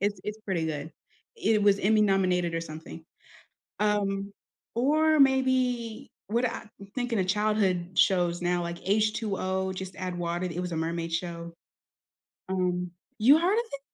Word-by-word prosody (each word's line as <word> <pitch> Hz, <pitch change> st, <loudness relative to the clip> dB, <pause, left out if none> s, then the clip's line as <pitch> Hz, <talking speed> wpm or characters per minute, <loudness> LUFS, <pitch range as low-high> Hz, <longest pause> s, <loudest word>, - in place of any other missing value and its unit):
It's 200 Hz, -1 st, -1 dB
it's 210 Hz, +1 st, -4 dB
pretty 190 Hz, -6 st, -2 dB
good. 155 Hz, 0 st, -4 dB, 0.4 s
It 220 Hz, -, +2 dB
was 200 Hz, -1 st, +4 dB
Emmy 215 Hz, +2 st, +3 dB
nominated 185 Hz, -4 st, +2 dB
or 165 Hz, -, 0 dB
something, 160 Hz, 0 st, -9 dB, 0.8 s
um, 200 Hz, -1 st, 0 dB, 0.4 s
or 310 Hz, +5 st, +3 dB
maybe 255 Hz, -4 st, +2 dB, 0.2 s
what 235 Hz, +4 st, +1 dB
I'm 215 Hz, -, -8 dB, 0.3 s
thinking 245 Hz, -4 st, -1 dB
of 185 Hz, -, 0 dB
childhood 195 Hz, -3 st, +1 dB
shows 175 Hz, -2 st, +3 dB
now 175 Hz, 0 st, +1 dB
like 170 Hz, 0 st, -4 dB
H2O: 195 Hz, -3 st, 0 dB
Just 190 Hz, 0 st, -6 dB
Add 185 Hz, -1 st, -4 dB
Water, 175 Hz, +1 st, -2 dB
th 170 Hz, -1 st, -6 dB
it -, -, -1 dB
was 180 Hz, -1 st, -4 dB
a 165 Hz, -, -2 dB
mermaid 165 Hz, +1 st, -2 dB
show, 170 Hz, 0 st, -4 dB, 1.0 s
um 180 Hz, -1 st, -1 dB, 0.3 s
you 260 Hz, +8 st, +7 dB
heard 355 Hz, +5 st, +2 dB
of 470 Hz, +2 st, +1 dB
it? 280 Hz, -, -5 dB
195 Hz, 155 wpm, -28 LUFS, 175-220 Hz, 1.0 s, you